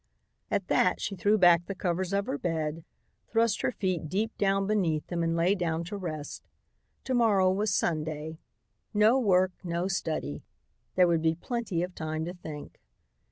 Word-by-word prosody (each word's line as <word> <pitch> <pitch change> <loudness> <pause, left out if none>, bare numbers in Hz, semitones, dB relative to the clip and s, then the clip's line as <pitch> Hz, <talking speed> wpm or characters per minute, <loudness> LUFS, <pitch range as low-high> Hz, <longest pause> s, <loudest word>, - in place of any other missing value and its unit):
At - - -1
that - - +2
she 200 - -3
threw 205 +4 +2
back 175 -3 +5
the 195 - -4
covers 180 0 -1
of 200 0 0
her 265 +4 -3
bed, 160 - -2 0.4
thrust 225 -2 +1
her - - +1
feet 185 -8 -2
deep 215 +6 -1
down 195 -1 +2
beneath 180 -7 0
them 175 -1 -3
and 165 0 0
lay 170 +3 +3
down 170 -4 -1
to 190 +5 -6
rest. 155 -7 -6 0.6
To 260 - -2
morrow 205 -6 +4
was 205 +2 0
Sunday; 155 -2 -2 0.6
no 215 +5 +5
work, 185 -5 +3
no 175 +1 -1
study. 155 - -2 0.5
There 180 -1 +5
would 165 -2 +2
be 160 0 +2
plenty 200 -2 -2
of 180 0 -5
time 155 -1 -3
to 175 - -5
think. 155 -5 -9
180 Hz, 170 wpm, -29 LUFS, 165-200 Hz, 0.6 s, back